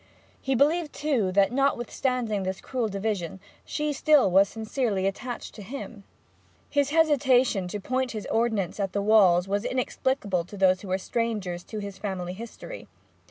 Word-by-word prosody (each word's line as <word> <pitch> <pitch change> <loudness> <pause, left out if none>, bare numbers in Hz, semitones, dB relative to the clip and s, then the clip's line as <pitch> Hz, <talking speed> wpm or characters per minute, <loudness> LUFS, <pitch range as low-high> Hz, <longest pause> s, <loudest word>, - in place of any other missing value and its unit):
He 270 0 0
believed, 300 +4 +2
too, 255 -11 0
that, 200 +2 +4
notwithstanding 250 -4 0
this 190 0 -3
cruel 250 -4 -2
division, 195 -3 -3 0.2
she 300 0 -2
still 285 -8 +4
was 195 +2 +5
sincerely 220 -3 -1
attached 240 +5 -4
to 215 - -10
him. 215 -2 -8 0.7
His 285 -1 +2
hesitation 260 - +3
to 205 +3 -4
point 255 +4 -1
his 215 -2 -5
ordnance 220 -5 0
at 195 -2 -1
the 200 - 0
walls 195 -4 +5
was 200 +1 0
inexplicable 250 -7 -1
to 205 - -10
those 185 -1 +3
who 200 - -9
were 185 0 0
strangers 195 -4 -2
to 220 - -7
his 200 -2 -6
family 185 -3 -4
history. 235 - -9
215 Hz, 160 wpm, -26 LUFS, 195-260 Hz, 0.7 s, was